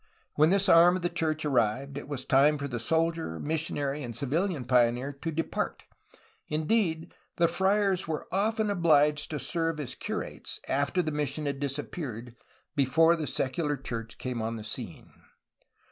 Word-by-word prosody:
When 155 +2 +4
this 195 +2 +3
arm 175 0 +7
of 185 - -4
the 175 - +1
church 155 -2 -1
arrived, 130 +1 +1
it 140 - -6
was 140 -3 -4
time 145 +3 +4
for 140 0 -4
the 125 -3 -4
soldier, 160 - 0
missionary, 150 -2 -2
and 120 -4 -6
civilian 150 - -1
pioneer 125 +2 +2
to 165 - -2
depart; 165 +1 -3 0.6
indeed, 160 +1 0 0.2
the 170 - +3
friars 190 +1 +1
were 155 -2 -3
often 215 +2 +1
obliged 150 -5 +3
to 155 - -3
serve 165 +1 -1
as 130 -3 -3
curates, - - -5
after 145 +6 +1
the 155 - -2
mission 150 0 -2
had 140 -1 -2
disappeared, 135 -4 -5 0.4
before 160 +5 +4
the 155 -3 -3
secular 145 +3 -1
church 115 -3 -6
came 125 -3 -4
on 115 +1 -2
the 110 - -7
scene. 105 - -6
150 Hz, 160 wpm, -28 LUFS, 130-165 Hz, 0.6 s, arm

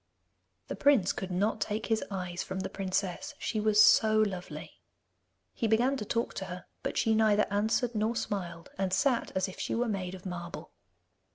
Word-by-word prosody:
The - - -4
prince 270 -10 +4
could 190 - -5
not 205 +4 0
take 215 +2 -1
his 225 -1 0
eyes 180 -3 -4
from 190 0 -4
the 190 0 -4
princess, 195 - -2
she 220 - -2
was 210 0 +3
so 215 0 +6
lovely! 195 -4 -2 0.7
He 230 - -1
began 240 +5 +3
to 215 - -4
talk 230 +3 -1
to - - -3
her, 180 -1 -7 0.2
but - - -3
she 225 - +3
neither 215 -1 +4
answered 220 +4 +1
nor 220 +2 0
smiled, 180 -7 -4
and 190 -1 0
sat 255 +3 +1
as 190 +1 +1
if 185 - -10
she - - -2
were 240 +1 +1
made 190 -4 -3
of 185 - -13
marble. 175 -2 -6
205 Hz, 185 wpm, -30 LUFS, 185-225 Hz, 0.7 s, so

